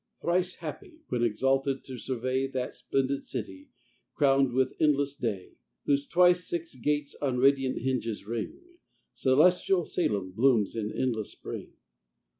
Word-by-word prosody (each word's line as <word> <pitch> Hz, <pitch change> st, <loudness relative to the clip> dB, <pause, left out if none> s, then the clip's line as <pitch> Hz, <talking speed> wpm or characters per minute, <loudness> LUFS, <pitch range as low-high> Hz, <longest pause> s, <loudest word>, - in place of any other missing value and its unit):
Thrice 180 Hz, +1 st, 0 dB
happy, 345 Hz, -5 st, -8 dB
when 120 Hz, -, -1 dB
exalted 135 Hz, +4 st, +1 dB
to 130 Hz, -2 st, -8 dB
survey 130 Hz, +2 st, -1 dB
That 130 Hz, -2 st, -3 dB
splendid 135 Hz, 0 st, -1 dB
city, 95 Hz, -6 st, -6 dB, 0.5 s
crown'd 135 Hz, -3 st, +3 dB
with 130 Hz, +1 st, +1 dB
endless 145 Hz, -2 st, +3 dB
day, 105 Hz, -9 st, -4 dB, 0.3 s
Whose 140 Hz, 0 st, +1 dB
twice 180 Hz, 0 st, +4 dB
six 170 Hz, -1 st, -3 dB
gates 145 Hz, +3 st, -1 dB
on 135 Hz, -3 st, 0 dB
radiant 135 Hz, 0 st, +3 dB
hinges 115 Hz, -6 st, -2 dB
ring: 115 Hz, 0 st, -4 dB, 0.6 s
Celestial 175 Hz, +6 st, +3 dB
Salem 100 Hz, -, -1 dB
blooms 115 Hz, -1 st, +2 dB
in 110 Hz, -1 st, -2 dB
endless 115 Hz, -5 st, -2 dB
spring. -, -, -8 dB
135 Hz, 130 wpm, -28 LUFS, 120-145 Hz, 0.6 s, twice